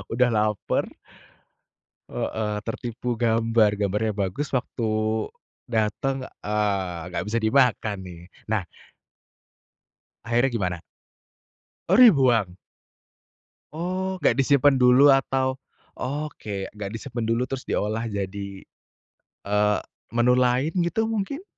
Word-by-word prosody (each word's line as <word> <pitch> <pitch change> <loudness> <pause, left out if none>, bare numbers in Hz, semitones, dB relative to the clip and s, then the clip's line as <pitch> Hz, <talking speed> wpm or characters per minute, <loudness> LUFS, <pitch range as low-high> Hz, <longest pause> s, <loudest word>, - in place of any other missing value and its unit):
Udah 125 +2 +3
laper. 105 -2 0 1.3
Heeh, 105 -1 -2
tertipu 120 +1 -4
gambar, 115 -2 +3
gambarnya 105 +2 -1
bagus 100 +8 -2
waktu 125 -1 -3 0.8
datang, 120 +4 -1 0.2
eee, 95 -5 -2
gak - - -2
bisa 110 - -3
dimakan 110 -3 +2
nih, 90 -3 -9 0.3
nah 110 -3 0 1.6
akhirnya 120 +3 +2
gimana? 95 -7 -2 1.1
Oh, 190 - +5
dibuang? 130 - +5 1.2
Oh, 185 +3 -2
gak 140 - +3
disimpan 140 0 +4
dulu 125 +3 +7
atau 135 0 +1 0.4
oke 125 -8 -4
gak 105 -1 -6
disimpan 115 0 -4
dulu 115 +2 +1
terus 130 0 -5
diolah 110 +2 -1
jadi, 100 -1 -5 0.8
eee, 105 +1 +2 0.4
menu 120 +1 +4
lain 125 +4 +2
gitu 175 +6 +1
mungkin? 225 - -3
115 Hz, 100 wpm, -24 LUFS, 105-135 Hz, 1.6 s, dulu